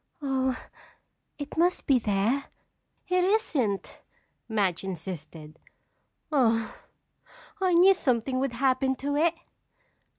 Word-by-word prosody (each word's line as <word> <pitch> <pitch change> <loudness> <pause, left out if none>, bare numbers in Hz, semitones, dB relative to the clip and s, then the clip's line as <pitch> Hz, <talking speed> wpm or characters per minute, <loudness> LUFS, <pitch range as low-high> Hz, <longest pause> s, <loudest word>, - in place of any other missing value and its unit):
"Oh, 265 -3 0 0.8
it 290 +1 -7
must 355 +2 +2
be 270 -4 +4
there." 220 +6 0 0.6
"It 365 0 +2
isn't," 305 - 0 0.5
Madge 200 -6 0
insisted. 165 -4 -7 0.7
"Oh, 230 -6 +2 0.9
I 370 -2 +3
knew 370 +3 +7
something 255 -6 0
would 270 -2 -1
happen 265 +1 +1
to 285 +2 -3
it!" 330 +3 +2
260 Hz, 100 wpm, -27 LUFS, 210-300 Hz, 0.9 s, knew